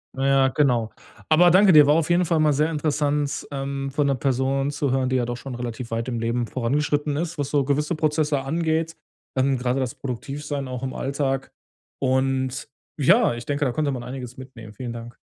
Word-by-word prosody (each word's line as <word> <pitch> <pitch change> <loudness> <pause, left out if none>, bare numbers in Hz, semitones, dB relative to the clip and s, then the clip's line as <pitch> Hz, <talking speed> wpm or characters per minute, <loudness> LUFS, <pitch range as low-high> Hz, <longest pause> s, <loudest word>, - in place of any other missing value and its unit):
Na 135 +1 0
ja, 135 -1 +4
genau. 125 -6 +1 0.4
Aber 175 +3 +6
danke 190 +2 +6
dir, 150 -3 +8
war 145 - +5
auf 165 0 +1
jeden 175 +1 +3
Fall 165 -1 +1
mal 155 -1 +4
sehr 150 +3 +1
interessant, 145 -2 -1
ähm, 135 0 -3
von 145 +1 +1
'ner 140 - +2
Person 135 +1 0
zu 145 -2 -1
hören, 130 0 +1
die 130 - 0
ja 125 -2 +1
doch 120 0 -4
schon 130 -1 -7
relativ 120 0 -5
weit 115 +2 -2
im 120 -2 -2
Leben 115 +1 -1
vorangeschritten 145 +4 -1
ist, 165 +1 -3
was 145 -1 -2
so 145 -1 +2
gewisse 150 +4 0
Prozesse 150 -2 +1
angeht. 160 +3 -1 0.4
Dann 135 0 +2
grade 125 +1 -1
das 130 -3 -2
Produktiv 135 +3 -6
sein 145 -2 -3
auch 125 0 -6
im 130 - -3
Alltag. 135 -1 -2 0.5
Und 130 +1 0 0.3
ja 190 - +4
ich 120 0 -8
denke, 145 +2 -1
da 130 - +1
konnte 145 +3 -1
man 125 -3 -4
einiges 125 -1 -7
mitnehmen. 120 -5 -11
Vielen 120 +2 -6
Dank. 115 +1 -8
135 Hz, 210 wpm, -23 LUFS, 130-150 Hz, 0.5 s, dir